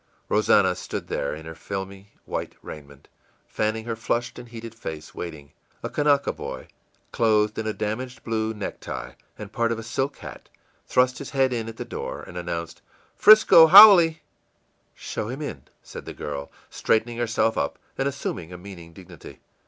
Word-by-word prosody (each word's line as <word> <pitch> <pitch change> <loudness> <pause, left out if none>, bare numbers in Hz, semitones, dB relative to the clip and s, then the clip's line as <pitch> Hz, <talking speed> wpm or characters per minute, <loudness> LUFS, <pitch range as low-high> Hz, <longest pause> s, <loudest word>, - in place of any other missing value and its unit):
Rosannah - - +3
stood - - -6
there, 70 - -2
in 80 +1 -11
her 80 - -7
filmy 95 +2 -7
white - - -5
raiment, 70 -2 -11 0.4
fanning 110 +1 -2
her 115 -1 -3
flushed 120 +2 -2
and 120 -1 -11
heated 115 -1 -9
face, 80 -9 -8
waiting. 75 -5 -8 0.3
A - - -4
Kanaka 145 -1 +2
boy, - - -8 0.4
clothed 105 -2 +2
in 110 - -3
a - - 0
damaged 125 +5 -5
blue 110 -1 -1
necktie 105 -2 -6 0.3
and 105 -1 -9
part 115 +1 0
of 115 - -1
a 115 - -7
silk 135 +5 -3
hat, - - -11 0.4
thrust 125 0 +2
his 140 - -7
head 135 -2 +1
in 115 -2 -3
at 115 - -10
the - - -5
door, - - -6
and - - -12
announced, 85 -1 -5 0.4
ì'Frisco 210 -6 +8
haole!î 175 -5 +9 0.8
ìShow 110 - -5
him 135 +4 -6
in,î 75 - -7 0.2
said - - -10
the - - -8
girl, 70 -1 -6 0.2
straightening 115 +1 0
herself 115 -1 +1
up 70 - -2 0.2
and 135 - -1
assuming 90 - -5
a 90 - -8
meaning 90 -3 -11
dignity. 90 -2 -13
110 Hz, 170 wpm, -24 LUFS, 90-120 Hz, 0.8 s, haole!î